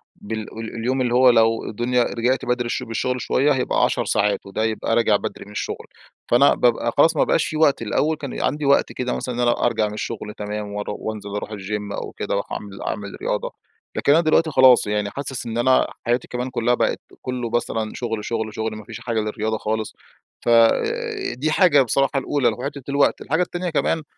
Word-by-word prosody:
بال 110 +1 -5 0.2
ال 115 +1 -6
اليوم 130 +3 -1
اللي 120 -1 0
هو 125 0 +6
لو 115 -1 +3
الدنيا 120 +3 0
رجعت 125 +3 0
بدري 125 0 0
الش 120 - -2
بالشغل 125 +2 -2
شوية 145 +3 +2
هيبقى 130 -2 +1
10 - - +1
ساعات، 100 -1 +1
وده 100 +3 -3
يبقى 110 +1 0
راجع 115 -3 +3
بدري 100 - -4
من 105 - -13
الشُغل، - - -4 0.5
فأنا 140 +4 +6
بابقى 120 -1 +2
خلاص 160 +3 +5
ما - - +5
بقاش - - +2
في 155 - -3
وقت، 145 -6 +3
الأول 150 +8 0
كان 140 -3 -5
عندي 150 -1 -1
وقت 140 - +3
كده 125 0 -2
مثلاً 125 -2 -4
إن - - -4
أنا 120 0 +2
أرجع 110 -3 +1
من 105 - -6
الشغل 105 -1 -5
تمام، 105 0 -4
وأرو 105 0 -4
وأنزل 105 -2 -5
أروح 105 +1 -4
الGym 105 0 -4
أو - - -7
كده، - - -4
أروح - - -2
أعمل 100 -1 -6
أعمل 100 -1 -5
رياضة، - - -2 0.5
لكن 140 - +3
أنا 165 +3 +6
دلوقتي 160 0 +2
خلاص 130 -5 +6
يعني 105 -1 -1
حاسِس 135 -1 -5
إن 115 0 -4
أنا 130 +2 +3 0.2
حياتي 120 +1 0
كمان 125 +1 -3
كُلّها 120 -1 +1
بقت - - 0 0.2
كُلّه 125 -2 -3
مثلًا 115 -2 -1
شُغل، 115 -3 -4
شُغل، 110 -2 -3
شُغل 110 0 -3
ما 110 - -9
فيش 115 0 -8
حاجة 115 -2 -2
للرِّياضة 110 +1 -2
خالص، 110 0 -3 0.5
ف - - +1
آآ 115 0 +2
دي 150 +5 -1
حاجة 155 -6 +5
بصراحة 135 +2 +1
الأولى 135 -3 0
اللي 110 - 0
هو - - -6
حِتّة 140 -1 -5
الوقت، 140 0 +2
الحاجة 160 +6 0
التانية 175 0 -2
كمان 160 0 0
120 Hz, 210 wpm, -22 LUFS, 110-130 Hz, 0.5 s, هو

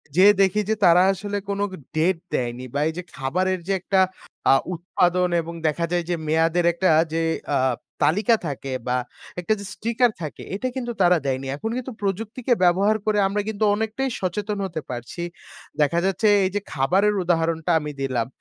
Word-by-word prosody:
যেয়ে 200 +3 +7
দেখি 195 +2 +3
যে 220 - +2
তারা 175 +1 +7
আসলে 205 +2 -4
কোন 200 0 -2
গ - - -10 0.2
date 165 +2 +1
দেয়নি 125 +1 -2
বা 145 - 0
এই 160 - -2
যে 180 - -4
খাবারের 185 +8 -1
যে 195 - +1
একটা 190 0 +1 0.5
আ - - +8 0.2
উৎপাদন 180 +1 +1
এবং 170 +1 -7
দেখা 170 +3 0
যায় 175 -1 +1
যে, 175 - +1
মেয়াদের 165 +2 +2
একটা 185 +2 +1 0.2
যে 165 - +1 0.3
আ - - +3 0.5
তালিকা 215 +8 +3
থাকে 135 -1 -5
বা 125 +1 +1 0.4
একটা 180 +5 +1
যে 200 - -7
sticker 235 +3 +1
থাকে, 155 -3 -6
এটা 255 +6 -2
কিন্তু 245 -2 -3
তারা 175 -1 +5
দেয়নি 135 0 -1
এখন 220 +10 -4
কিন্তু 255 +1 -5
প্রযুক্তিকে 220 +5 -1
ব্যবহার 195 +5 +4
করে 215 -1 +1
আমরা 205 +2 -1
কিন্তু 220 0 -2
অনেকটাই 220 +5 -2
সচেতন 205 +3 -2
হতে 165 -4 -4
পারছি। 120 +7 -6 0.6
দেখা 170 +4 +3
যাচ্ছে 195 +3 +1 0.2
এই - - +1
যে - - +2
খাবারের 185 +9 +2
উদাহরণটা 165 -1 0
আমি 150 0 -5
দিলাম, 125 -4 -1
180 Hz, 180 wpm, -23 LUFS, 160-205 Hz, 0.6 s, আ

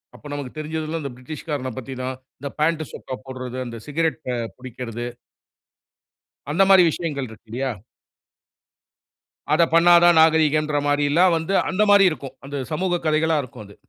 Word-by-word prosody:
அப்ப - - -17
நமக்கு 145 -1 -6
தெரிஞ்சதெல்லாம் 155 +1 -4
இந்த 140 - -4
பிரிட்டிஷ் 135 +5 -9
காரன 130 -4 -2
பத்தி 130 +1 -6
தான். 130 +1 -3 0.2
இந்த 140 - -5
பேண்ட்டு, 155 0 +1
சொக்கா 130 - -6
போடுறது, 130 -1 -6
அந்த 115 -1 -7
சிகரெட் 160 +2 -1
அ - - -2 0.2
பிடிக்கிறது. 120 -2 -6 1.4
அந்த 165 +6 +3
மாரி 190 -2 +8
விஷயங்கள் 145 -6 -4
இருக்கு 110 +1 -15
இல்லையா? 130 +3 -2 1.8
அத 155 +2 +4
பண்ணா 170 +1 +6
தான் 175 -1 +6
நாகரீகன்ற 155 -1 +3
மாரில்லாம் 145 +5 +3
வந்து 165 +4 -2 0.2
அந்த 190 +2 +1
மாரி 200 -1 +7
இருக்கும். 135 -4 -7
அந்த 140 +1 -6 0.2
சமூகக் 175 +2 -1
கதைகளா 155 +1 +2
இருக்கும் 125 -4 -10
அது. 100 - -15
150 Hz, 150 wpm, -22 LUFS, 130-160 Hz, 1.8 s, மாரி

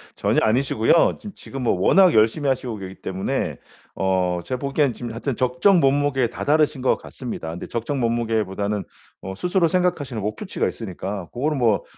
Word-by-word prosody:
전혀 - - +1
아니시고요. 120 +5 +3
짐 210 - -8
지금 135 -1 -7
뭐 120 - +2
워낙 185 - +5
열심히 115 +7 +3
하시고 125 -3 -2
계시기 95 -1 -8
때문에 95 0 -2 0.4
어 95 -2 +1
제가 130 +8 -3
보기에는 140 -1 +1
지금 120 -1 -6
하여튼 120 +3 -3
적정 130 +10 +3
몸무게에 140 -2 +2
다다르신 145 +3 +1
것 130 - +2
같습니다. 115 -10 -7
근데 85 - -7
적정 120 +4 -3
몸무게보다는 110 -4 -1 0.4
어 95 0 -6
스스로 180 - +1
생각하시는 165 -9 0
목표치가 105 +2 -2
있으니까 95 -2 -5
고거는 145 +4 -1
뭐 110 -4 +2
120 Hz, 415 characters per minute, -22 LUFS, 105-140 Hz, 0.4 s, 워낙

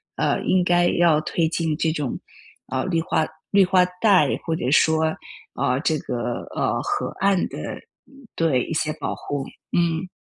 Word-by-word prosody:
呃， - - 0
应 185 -1 +2
该 175 0 +3
要 165 -4 +3
推 160 +1 0
进 160 -2 -1
这 160 0 +1
种， 145 -5 -3 0.5
呃， 130 0 -1
绿 170 -3 0
化 160 - 0 0.3
绿 200 -1 +6
化 180 -1 +4 0.2
带 190 -10 +4
或 165 -1 0
者 125 - -2
说， 160 +1 +3 0.4
呃， 125 +1 0
这 160 -2 +1
个， 120 0 -3
呃， - - 0
河 - - -2
岸 195 -2 +2
的 - - -6 0.3
嗯， 275 -3 -18
对 155 -7 +2
一 - - -5
些 155 -1 0
保 - - -3
护， 140 -2 -4 0.3
嗯。 170 +1 0
165 Hz, 180 characters per minute, -23 LUFS, 155-180 Hz, 0.5 s, 绿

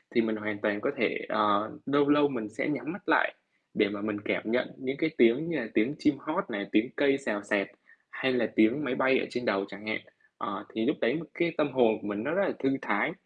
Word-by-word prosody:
thì 115 - +6
mình 110 -1 0
hoàn 105 -1 -3
toàn 105 0 0
có - - 0
thể, 115 - +1
ờ, 105 0 +2
lâu 145 +1 +3
lâu 145 0 +5
mình 115 -6 -4
sẽ 110 - -3
nhắm - - -3
mắt - - -9
lại - - +4 0.4
để 105 -2 +3
mà 100 0 -5
mình 105 0 -2
cảm - - 0
nhận 125 +1 0
những 130 +1 -4
cái 160 - +1
tiếng 120 +8 +4
như 165 - -1
là 115 - -3
tiếng 130 +7 +2
chim 150 - +3
hót 155 - -3
này, 100 -4 -3
tiếng 110 +4 +3
cây 140 -1 +3
xào 105 -7 -3
xạc 100 -1 +1 0.4
hay 130 -1 0
là 120 -3 +2
tiếng 110 +7 +4
máy 125 -2 -1
bay 130 0 +3
ở - - -1
trên 125 0 -4
đầu 100 -3 +1
chẳng 100 +2 -11
hạn. 110 - -1 0.4
Ờ, - - -5
thì 110 0 0
lúc - - +2
đấy 155 - +2
cái 170 -1 0
tâm 150 -1 +1
hồn 120 -4 +4
của - - -7
mình 105 +1 -3
nó - - -2
rất 200 - +2
là - - -1
thư 135 - +1
thái, - - +1
115 Hz, 255 wpm, -29 LUFS, 105-140 Hz, 0.4 s, thì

